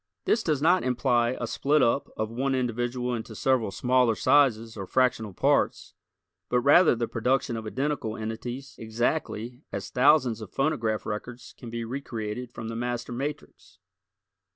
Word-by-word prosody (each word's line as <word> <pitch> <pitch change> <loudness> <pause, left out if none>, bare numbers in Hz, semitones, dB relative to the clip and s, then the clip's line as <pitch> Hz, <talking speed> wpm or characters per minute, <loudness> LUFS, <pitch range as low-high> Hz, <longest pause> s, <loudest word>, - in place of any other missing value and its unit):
This 225 - +2
does 150 -7 0
not 180 +3 +4
imply 125 -1 +1
a 120 - -2
split 140 +4 +2
up 120 +4 +1
of 110 0 -2
one 135 +3 0
individual 125 0 -1
into 110 -1 -5
several 130 -2 +1
smaller 125 +2 +2
sizes 115 -2 +3
or 95 -3 -6
fractional 125 -4 +1
parts, 90 - +1 0.6
but 125 0 +2
rather 145 +4 +6
the 115 0 -2
production 125 +1 0
of 110 -1 -5
identical 130 -2 -2
entities 120 +5 -6
exactly 120 +1 -2
as 100 -1 -5
thousands 125 -4 +4
of 105 - -8
phonograph 115 -7 0
records 120 +3 -6
can 120 - -10
be 115 0 -4 0.2
created 115 0 -5
from 115 - -7
the 115 - -5
master 120 0 -3
matrix. 140 +5 -6
120 Hz, 155 wpm, -27 LUFS, 115-130 Hz, 0.6 s, rather